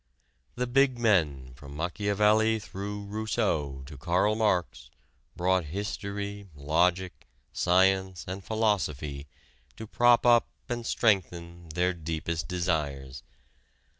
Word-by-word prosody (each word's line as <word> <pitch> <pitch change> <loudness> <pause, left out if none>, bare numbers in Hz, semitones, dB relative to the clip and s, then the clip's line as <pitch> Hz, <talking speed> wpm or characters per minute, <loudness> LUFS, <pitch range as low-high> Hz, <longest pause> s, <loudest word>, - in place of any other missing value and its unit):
The 125 - -1
big 130 +1 +2
men 75 - +1
from 70 +2 -12
Machiavelli 105 +6 +2
through 100 -1 -6
Rousseau 100 - -2
to 70 0 -11
Karl 90 +7 +2
Marx 105 -6 0 0.5
brought 90 0 +1
history, 100 +3 -5
logic, 85 +6 0 0.3
science 95 0 +2
and 95 +1 -6
philosophy 75 -11 -1 0.5
to - - -7
prop 120 +2 +4
up 120 -1 +5 0.2
and 120 -2 -4
strengthen 85 -5 0
their 90 +3 0
deepest 80 0 -4
desires. 75 -8 -2
95 Hz, 105 wpm, -28 LUFS, 80-105 Hz, 0.5 s, up